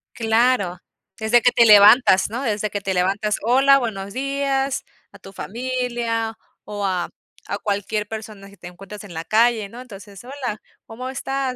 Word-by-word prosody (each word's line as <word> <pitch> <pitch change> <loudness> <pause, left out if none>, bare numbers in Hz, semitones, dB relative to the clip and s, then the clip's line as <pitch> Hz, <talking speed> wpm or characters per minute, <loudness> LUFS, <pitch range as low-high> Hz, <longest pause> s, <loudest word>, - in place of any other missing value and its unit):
Claro. 225 -5 +1 0.4
Desde 230 +2 +3
que 245 - +5
te 235 - +4
levantas, 205 -1 +6
¿no?, 240 - -4
desde 215 -4 -2
que 205 - -4
te 195 -1 -2
levantas: 200 +3 0
"Hola, 270 +4 +5
buenos 200 -6 -4
días", 275 0 -1 0.3
a 200 - -16
tu 195 0 -13
familia, 235 -1 -3 0.3
o 205 -1 -5
a 180 -2 -1 0.4
a - - -3
cualquier 210 0 -3
persona 215 -2 -9
que 200 - -18
te 175 - -11
encuentres 195 +3 -11
en 185 -4 -11
la 160 - -5
calle, 220 0 +2
¿no? 235 - -11
Entonces: 200 -4 -12
"Hola, 250 -4 -6 0.2
¿cómo 255 +3 -7
estás?" 270 0 -3
220 Hz, 165 wpm, -21 LUFS, 200-250 Hz, 0.4 s, levantas